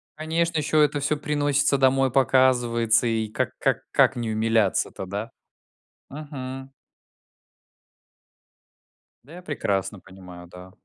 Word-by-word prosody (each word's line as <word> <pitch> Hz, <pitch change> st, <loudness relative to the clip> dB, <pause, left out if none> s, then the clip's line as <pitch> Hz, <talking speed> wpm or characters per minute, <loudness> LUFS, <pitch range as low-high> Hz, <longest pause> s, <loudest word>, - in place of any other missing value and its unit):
Конечно, 165 Hz, +1 st, -1 dB
ещё 150 Hz, +1 st, +2 dB
это 145 Hz, -1 st, +2 dB
всё 150 Hz, +1 st, -1 dB
приносится 145 Hz, -2 st, +1 dB
домой 135 Hz, -1 st, +2 dB
показывается, 120 Hz, -3 st, +2 dB
и 110 Hz, -1 st, -1 dB
как -, -, -2 dB
как -, -, +1 dB
как -, -, +3 dB
не 115 Hz, -2 st, -3 dB
умиляться-то, 110 Hz, -4 st, 0 dB
да? 100 Hz, +4 st, -6 dB, 0.8 s
Мгм. 135 Hz, -2 st, -8 dB, 2.5 s
Да 150 Hz, +6 st, -16 dB
я 180 Hz, -, -10 dB
прекрасно 105 Hz, -, -3 dB
понимаю, 90 Hz, -2 st, -13 dB
да. 90 Hz, +1 st, -13 dB
130 Hz, 110 wpm, -24 LUFS, 110-145 Hz, 2.5 s, как